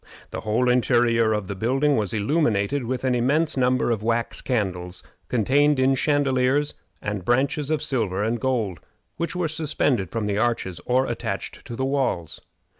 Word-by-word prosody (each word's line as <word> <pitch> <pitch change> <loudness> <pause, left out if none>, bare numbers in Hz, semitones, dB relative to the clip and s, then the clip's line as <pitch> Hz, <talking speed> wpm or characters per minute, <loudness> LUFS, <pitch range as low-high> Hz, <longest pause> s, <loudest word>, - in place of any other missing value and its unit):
The - - -4
whole 110 +4 +1
interior 120 -2 +3
of 105 -3 -1
the 100 - -3
building 135 +8 +1
was 105 -4 -1
illumined 115 +1 +1
with 130 +1 -2
an 130 -1 +2
immense 145 +7 +2
number 125 -1 +2
of 110 -3 -1
wax 115 +1 -1
candles, 90 -7 -2 0.2
contained 140 +5 +3
in 130 +1 +3
chandeliers 140 0 +1 0.3
and 105 -2 -3
branches 135 - +1
of 155 -1 0
silver 110 -9 -1
and 115 +2 0
gold, 110 -8 -1 0.4
which 170 +1 -3
were 180 -2 0
suspended 145 - 0
from 115 -2 -2
the 105 0 0
arches 110 -7 -1
or 130 +2 +3
attached 100 -6 -4
to 120 - -6
the 130 - -1
walls. 130 - -1
125 Hz, 165 wpm, -24 LUFS, 105-135 Hz, 0.4 s, interior